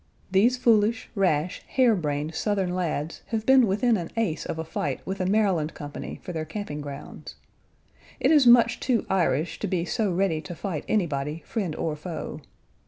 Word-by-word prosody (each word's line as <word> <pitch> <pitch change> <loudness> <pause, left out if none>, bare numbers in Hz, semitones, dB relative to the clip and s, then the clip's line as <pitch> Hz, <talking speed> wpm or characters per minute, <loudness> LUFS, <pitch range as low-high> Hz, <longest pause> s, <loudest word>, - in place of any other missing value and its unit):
These 225 +7 +4
foolish, 225 -2 +2
rash, 180 -5 0
hare 250 -4 +3
brained 150 -2 -2
Southern 195 0 0
lads 165 -3 -2
have 225 -2 -2
been 265 -3 +6
within 220 +4 +2
an 170 -3 -5
ace 180 -9 -1
of - - -3
a 160 - -2
fight 145 -3 -3
with 190 0 -3
a 185 - 0
Maryland 190 -7 +1
company 145 0 -7
for 180 - -6
their 160 -1 -2
camping 155 -3 -5
grounds. 145 0 -8 0.8
It - - +3
is 295 -5 +6
much 235 0 +6
too 250 -4 0
Irish 170 -4 +1
to 210 - -2
be 175 -2 -1
so 210 +2 0
ready 175 -3 +1
to 170 +2 -8
fight 165 -5 -4
anybody, 155 -5 -1
friend 190 -9 -3
or 155 -2 -2
foe. 155 -1 -6
185 Hz, 175 wpm, -26 LUFS, 155-215 Hz, 0.8 s, been